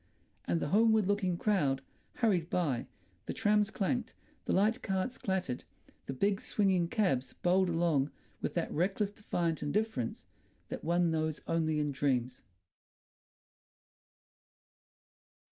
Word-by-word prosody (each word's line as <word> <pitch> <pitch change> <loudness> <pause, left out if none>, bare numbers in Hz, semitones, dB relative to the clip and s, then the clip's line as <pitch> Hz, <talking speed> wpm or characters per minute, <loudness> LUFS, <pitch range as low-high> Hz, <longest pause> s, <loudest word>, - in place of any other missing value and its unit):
And 85 -1 +1
the - - -2
homeward 220 +2 +4
looking 195 -3 +1
crowd 145 -10 +1 0.3
hurried 185 -8 +1
by, 150 -9 0 0.4
the - - -2
trams 210 -1 +3
clanked, 230 +4 -1 0.3
the - - -1
light 220 +6 +3
carts 195 +5 -1
clattered, 185 -10 -2 0.4
the 135 - -2
big 200 +9 +1
swinging 190 -4 +2
cabs 170 - 0
bowled 185 +1 +4
along 165 -5 +2 0.3
with - - -3
that - - -1
reckless, 195 +5 0
defiant 175 -6 -2
indifference 145 - -1 0.4
that - - -5
one 170 0 +2
knows 155 -1 -1
only 160 -2 +1
in 150 -1 0
dreams.... 130 -3 0
180 Hz, 120 wpm, -32 LUFS, 150-205 Hz, 0.4 s, homeward